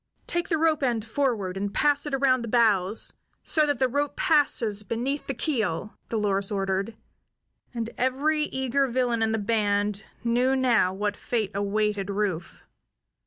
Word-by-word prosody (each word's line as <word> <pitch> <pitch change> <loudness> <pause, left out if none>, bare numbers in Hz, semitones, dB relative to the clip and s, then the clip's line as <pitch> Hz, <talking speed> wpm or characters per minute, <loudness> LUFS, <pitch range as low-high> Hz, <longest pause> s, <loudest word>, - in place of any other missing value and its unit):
"Take 345 0 -2
the 325 - +2
rope 315 -1 +2
end 235 -5 0
forward, 225 -7 -1
and 200 +1 -2
pass 290 +5 +1
it 290 - -5
around 260 -2 +3
the 235 - -5
bows, 215 -4 +3 0.3
so 305 -2 +2
that 290 - +1
the 260 - +2
rope 285 +3 -1
passes 275 - +2
beneath 240 +7 -3
the 275 - -2
keel," 220 - -2
Dolores 200 -3 0
ordered, 195 +2 -2 0.7
and 230 -2 -3
every 295 +4 +1
eager 265 0 0
villain 240 -2 0
in 220 0 +2
the 220 - +1
band 205 -1 0 0.2
knew 245 +3 +2
now 240 -8 +3
what 205 +2 -2
fate 220 -5 -2
awaited 205 0 -1
Rufe. 195 -4 -3
230 Hz, 155 wpm, -26 LUFS, 205-270 Hz, 0.7 s, around